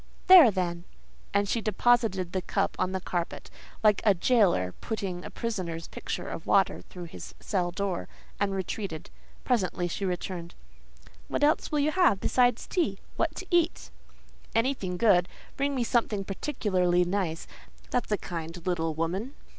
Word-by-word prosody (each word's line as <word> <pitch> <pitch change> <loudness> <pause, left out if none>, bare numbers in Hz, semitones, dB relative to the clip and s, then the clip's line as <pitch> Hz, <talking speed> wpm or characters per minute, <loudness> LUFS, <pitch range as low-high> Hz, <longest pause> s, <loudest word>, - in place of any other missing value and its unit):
"There, 365 -9 +10
then." 175 -3 -2 0.5
And 200 0 +2
she 230 +3 0
deposited 215 -4 +2
the 185 - -1
cup 195 +2 -1
on 185 0 +1
the 190 - -2
carpet, 175 -2 -4 0.3
like 210 -2 +4
a 205 -3 +5
jailor 175 - +3
putting 190 -5 -4
a - - -7
prisoner's 180 -8 -4
pitcher - - -5
of - - -7
water - - +3
through 180 - -10
his 170 - -9
cell 180 -4 -1
door, 190 0 -3 0.3
and 200 -1 +1
retreated. 190 -3 -4 0.3
Presently 190 -7 0
she 175 - -4
returned. 180 -2 -4 0.7
"What - - -1 0.3
will 300 - +1
you 295 +2 +2
have 350 - +3
besides 245 +1 +2
tea—what 320 - -2
to 380 - -6
eat?" 345 -1 +1 0.6
"Anything 225 -7 0
good. 180 -4 +4 0.3
Bring 280 0 0
me 250 - +1
something 225 -4 0
particularly 185 -5 +1
nice; 175 -3 -2 0.5
that's 245 -3 -1
a 210 - +3
kind 165 -1 -6
little 165 -3 -1
woman." 190 - -2
195 Hz, 145 wpm, -28 LUFS, 175-235 Hz, 0.7 s, There